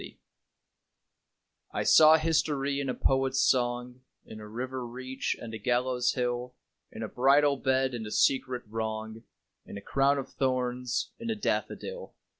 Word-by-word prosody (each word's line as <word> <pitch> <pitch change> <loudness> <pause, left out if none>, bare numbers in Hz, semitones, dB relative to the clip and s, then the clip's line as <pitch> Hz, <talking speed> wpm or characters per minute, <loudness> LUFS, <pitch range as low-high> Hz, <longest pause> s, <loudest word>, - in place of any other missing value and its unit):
SYMBOLS - - -11 1.6
I - - 0
saw 155 0 +7
history 145 -3 0
in 140 -1 -2
a 125 - -2
poet's 135 0 +1
song, 125 0 +1 0.2
In 110 - -10
a 105 - -9
river 130 +4 -5
reach 130 +2 -4
and 115 -1 -8
a 110 - -5
gallows 125 +2 +1
hill, 125 0 -2 0.4
In - - -7
a - - -3
bridal 140 +3 +3
bed, 130 -1 +1
and 110 -3 -5
a - - -8
secret 130 0 +1
wrong, 110 0 -5 0.4
In - - -9
a - - -8
crown 140 +6 +2
of 135 - -6
thorns: 125 -2 -1
in 230 0 -5
a 225 - 0
daffodil. 485 - -3
130 Hz, 155 wpm, -29 LUFS, 120-135 Hz, 1.6 s, saw